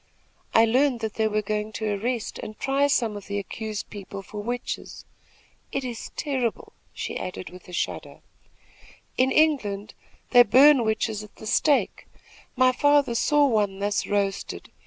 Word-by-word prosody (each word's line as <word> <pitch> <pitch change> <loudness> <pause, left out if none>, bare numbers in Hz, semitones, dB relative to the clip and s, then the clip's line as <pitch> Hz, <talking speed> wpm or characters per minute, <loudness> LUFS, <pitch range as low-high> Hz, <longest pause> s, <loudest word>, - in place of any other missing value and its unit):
I 225 - +7
learned 250 +1 +2
that 220 -1 -3
they 220 -1 +1
were 215 0 -1
going 210 +1 -2
to 215 -2 -2
arrest 230 +3 -3
and 215 - -8
try 275 +1 +2
some 230 -6 +1
of 205 - -9
the 200 +1 -3
accused 215 +1 -5
people 195 -1 -8
for 205 +2 -7
witches. 245 +3 -5 0.7
It 275 - -2
is 240 -3 -6
terrible," 260 -6 -2 0.2
she - - -5
added 185 0 -6
with 180 0 -13
a - - -11
shudder. 175 - -4 0.9
"In 260 +1 +2
England 225 -11 +1 0.4
they 245 - +9
burn 260 +4 +6
witches 220 -1 -1
at 210 - -14
the - - -11
stake. 285 +6 +1 0.5
My 255 0 +5
father 290 -1 +3
saw 295 +5 +3
one 210 -6 +1
thus 200 +1 -1
roasted. 200 -1 -2
220 Hz, 155 wpm, -25 LUFS, 205-260 Hz, 0.9 s, they